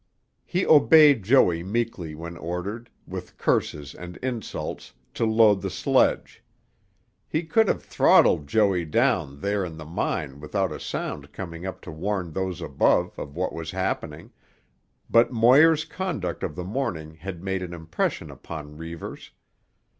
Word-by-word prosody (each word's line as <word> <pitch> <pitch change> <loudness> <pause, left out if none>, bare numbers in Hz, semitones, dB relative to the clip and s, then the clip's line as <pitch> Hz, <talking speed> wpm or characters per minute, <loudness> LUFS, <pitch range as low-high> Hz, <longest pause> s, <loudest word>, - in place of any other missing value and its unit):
He 185 +1 0
obeyed 150 -3 +7
Joey 95 -6 +4
meekly 95 -5 -3
when 85 +2 -7
ordered, 90 +8 -5 0.2
with - - -8
curses 75 -2 -1
and 90 +1 -9
insults, 120 - -5 0.2
to 115 - 0
load 110 -3 +4
the - - -3
sledge. - - +1 0.8
He 155 +2 -1
could 200 +7 +3
have - - 0
throttled 75 - +4
Joey 100 -1 +2
down 70 -2 0
there 100 +1 0
in 85 -3 -6
the 80 - -8
mine 75 -3 -3
without 95 +4 -1
a - - -6
sound - - -5
coming 85 -1 -7
up 95 - -7
to - - -9
warn 90 +2 -3
those 90 0 -3
above - - +2
of 70 0 -7
what - - -2
was 80 -1 -6
happening, 95 +2 -3 0.8
but 115 +2 +4
Moir's 140 +7 +5
conduct 155 - -4
of 75 - -4
the 90 - -5
morning 90 - -3
had 85 +2 -8
made 95 -1 -2
an 90 -1 -5
impression 80 -1 -3
upon 75 -2 -9
Reivers. 80 0 -8
95 Hz, 145 wpm, -25 LUFS, 80-115 Hz, 0.8 s, obeyed